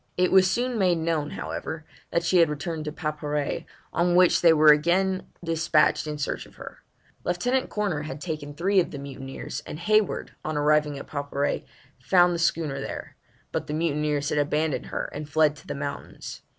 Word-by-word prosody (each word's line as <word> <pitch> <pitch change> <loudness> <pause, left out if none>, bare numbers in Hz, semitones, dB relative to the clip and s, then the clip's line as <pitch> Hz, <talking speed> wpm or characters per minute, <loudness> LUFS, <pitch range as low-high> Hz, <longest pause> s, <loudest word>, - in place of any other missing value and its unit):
It 180 0 +3
was 190 -1 +6
soon 245 +1 0
made 180 -3 +3
known, 160 -2 -1
however, 85 - -5 0.2
that 170 - 0
she 175 +2 +3
had 165 -2 +5
returned 155 +2 -4
to 150 - -3
Paparré, 150 -2 -3 0.3
on 175 +1 +2
which 180 -1 +5
they 170 - +7
were 155 -1 +7
again 185 +5 +2 0.2
despatched 160 -2 +2
in 150 0 -3
search 145 - -3
of - - -20
her. - - -10 0.4
Lieutenant 245 +9 0
Corner 200 -8 -1
had 150 -1 -6
taken 150 -3 -5
three 190 +5 +3
of 175 - +1
the 145 - -7
mutineers, 135 -1 -6
and 150 - -7
Hayward, 215 +4 +1
on 155 -1 -2
arriving 150 0 +2
at 135 - -7
Paparré, 145 -1 -2 0.3
found 175 +6 +4
the 170 - -2
schooner 155 -5 0
there, - - -6 0.4
but - - -3
the 150 - -2
mutineers 150 -2 0
had 150 - +1
abandoned 150 +1 0
her - - -3
and 150 0 -6
fled 150 0 +3
to 155 - -16
the - - -4
mountains. 140 0 -6
155 Hz, 185 wpm, -26 LUFS, 145-175 Hz, 0.4 s, they